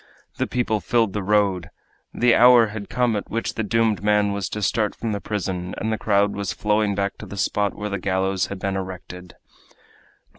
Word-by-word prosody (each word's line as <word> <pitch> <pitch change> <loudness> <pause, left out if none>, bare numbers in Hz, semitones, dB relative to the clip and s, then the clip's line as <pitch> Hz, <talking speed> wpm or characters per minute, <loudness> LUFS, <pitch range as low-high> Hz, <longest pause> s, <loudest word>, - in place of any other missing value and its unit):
The - - -1
people 120 -4 0
filled 115 -2 +1
the 105 - -2
road. 95 -3 +1 0.4
The 120 0 +3
hour 120 -2 +7
had 105 -2 -7
come 125 -3 +1
at 105 - -4
which 115 +1 -2
the - - -3
doomed 110 -2 +1
man 105 0 +2
was 100 -2 -3
to 105 - -4
start 105 +1 0
from 115 - -3
the 100 -1 -3
prison, 95 -3 -3
and 110 0 -1
the - - -1
crowd 100 -1 +2
was 100 -1 -3
flowing 105 -1 +1
back 100 0 -2
to - - -8
the 100 - -8
spot 100 +1 0
where 105 - -4
the 100 -1 -3
gallows 95 0 0
had 100 - -6
been 95 +1 -2
erected. 90 -1 -7
100 Hz, 200 wpm, -23 LUFS, 95-110 Hz, 0.4 s, hour